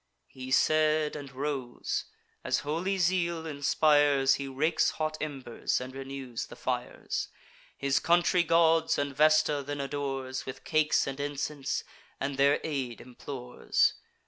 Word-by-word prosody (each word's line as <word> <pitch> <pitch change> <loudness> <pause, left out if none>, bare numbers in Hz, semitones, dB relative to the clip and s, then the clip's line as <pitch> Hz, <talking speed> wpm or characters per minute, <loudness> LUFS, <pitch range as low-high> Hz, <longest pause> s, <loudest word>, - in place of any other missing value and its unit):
He 130 0 -8
said, 155 +2 +3
and 140 -3 -7
rose; 135 -2 -3 0.4
as - - 0
holy 170 +7 -1
zeal 170 -2 +1
inspires, 145 -2 +3
He 140 - -4
rakes 155 +5 +1
hot 155 0 -2
embers, 135 -6 -2
and 130 +1 -7
renews 135 -3 -6
the - - -11
fires; - - -3 0.5
His 140 -1 +1
country 175 +1 +3
gods 165 -1 +3
and 140 -1 -2
Vesta 155 -1 +4
then 145 +1 -5
adores 135 -2 -3
With 130 - -7
cakes 155 -1 +2
and 135 0 -5
incense, 145 0 -2 0.4
and 140 +1 -2
their 140 +1 +4
aid 135 -6 -3
implores. 125 0 -1
145 Hz, 130 wpm, -29 LUFS, 135-155 Hz, 0.5 s, Vesta